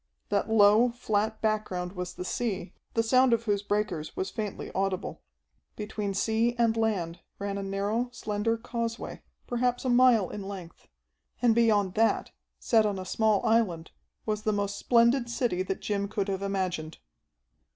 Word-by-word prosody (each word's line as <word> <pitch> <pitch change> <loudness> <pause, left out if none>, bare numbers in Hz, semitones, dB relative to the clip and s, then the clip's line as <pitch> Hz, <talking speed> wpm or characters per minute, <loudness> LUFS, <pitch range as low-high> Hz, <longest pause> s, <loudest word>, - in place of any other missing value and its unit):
That - - 0
low, 220 +2 +6
flat 220 -2 -1
background 210 -5 -1
was 180 -2 -5
the 180 - -5
sea, 205 -4 -3 0.2
the 225 - +3
sound 255 +2 +4
of 230 0 +1
whose 205 -3 0
breakers 205 -7 -2
was 190 - -2
faintly 210 -3 -5
audible. 195 -1 -2 0.5
Between 210 -2 -4
sea 225 +3 +1
and 230 -1 +3
land 195 -7 -1 0.2
ran 200 0 -3
a 200 - -3
narrow, 200 +5 -1
slender 220 0 -1
causeway, 230 0 -4 0.2
perhaps 245 +1 -1
a - - +1
mile 240 -5 +5
in 210 - -5
length. 195 -4 -9 0.5
And 240 -1 +4
beyond 210 -5 +3
that, 225 +2 +1 0.3
set 225 -2 +3
on 205 -2 0
a 185 - -5
small 215 +2 +1
island, 195 -8 +1 0.3
was 215 -1 -1
the 215 0 +1
most 205 -1 -1
splendid 235 +1 +3
city 235 -6 0
that 190 +1 -3
Jim 200 -1 -1
could 200 -1 -2
have 195 0 -2
imagined. 185 -5 -2
210 Hz, 160 wpm, -28 LUFS, 195-230 Hz, 0.5 s, low